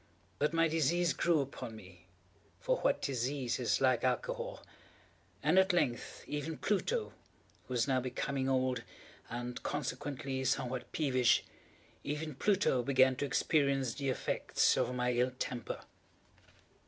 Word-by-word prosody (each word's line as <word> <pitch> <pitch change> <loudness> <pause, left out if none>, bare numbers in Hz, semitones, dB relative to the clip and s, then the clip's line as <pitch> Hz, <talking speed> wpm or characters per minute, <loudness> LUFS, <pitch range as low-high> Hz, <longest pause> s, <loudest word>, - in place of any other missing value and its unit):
But 150 +1 +2
my 165 0 +3
disease 165 +2 +2
grew 170 -3 +2
upon 130 -4 -6
me—for 90 -2 -7
what - - +1
disease 130 -1 -1
is - - +1
like - - +3
Alcohol!—and - - -2
at 190 0 +4
length 125 -9 -1
even 150 +2 -4
Pluto, 435 - 0 0.5
who 130 - -5
was 115 0 +2
now 130 -2 +2
becoming 130 +1 -2
old, 130 -2 +1 0.5
and 120 +1 -5
consequently 130 0 -3
somewhat 130 -1 -1
peevish—even 145 +2 -1
Pluto 190 -4 +2
began 130 +1 +4
to 145 - -1
experience 140 -3 +1
the 140 +1 -2
effects 130 - +1
of 125 - 0
my 125 0 +1
ill 125 +1 +1
temper. 120 -3 -4
135 Hz, 120 wpm, -33 LUFS, 125-155 Hz, 0.5 s, at